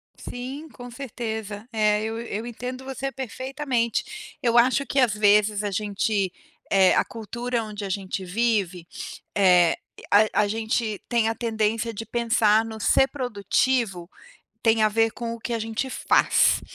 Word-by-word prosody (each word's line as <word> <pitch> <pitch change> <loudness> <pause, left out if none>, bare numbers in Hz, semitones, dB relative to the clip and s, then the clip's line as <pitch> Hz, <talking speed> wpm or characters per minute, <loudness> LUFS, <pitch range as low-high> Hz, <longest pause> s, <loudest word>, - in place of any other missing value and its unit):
Sim, 265 +6 -7
com 245 -3 -10
certeza, 220 -4 -5
eh, 210 -1 +2
eu 225 +1 -3
eu 225 -1 -5
entendo 250 +2 -6
você 270 0 -4
perfeitamente. 265 - -3
Eu 235 -1 +2
acho 255 +3 +4
que 275 - 0
às 245 -5 +4
vezes 210 0 +3
a 205 - -2
gente, 200 -1 0 0.4
eh, 190 -1 +5
a - - +4
cultura 235 +1 -4
onde 210 -1 -7
a 195 - -4
gente 190 0 -3
vive, 190 -4 0 0.5
eh, 180 -4 +5 0.4
a 210 +1 +4
a - - 0
gente 220 0 -1
tem 230 -2 +2
a 225 - -2
tendência 225 0 -1
de 225 +2 -6
pensar 225 -2 +3
no 220 -1 -7
ser 265 - +4
produtivo, 230 -6 -1 0.5
tem 225 -1 +3
a 215 - +5
ver 225 +1 +2
com 235 -1 -5
o - - -9
que 240 - -4
a 230 - 0
gente 225 +4 -3
faz, - - +3
225 Hz, 160 wpm, -24 LUFS, 210-240 Hz, 0.5 s, eh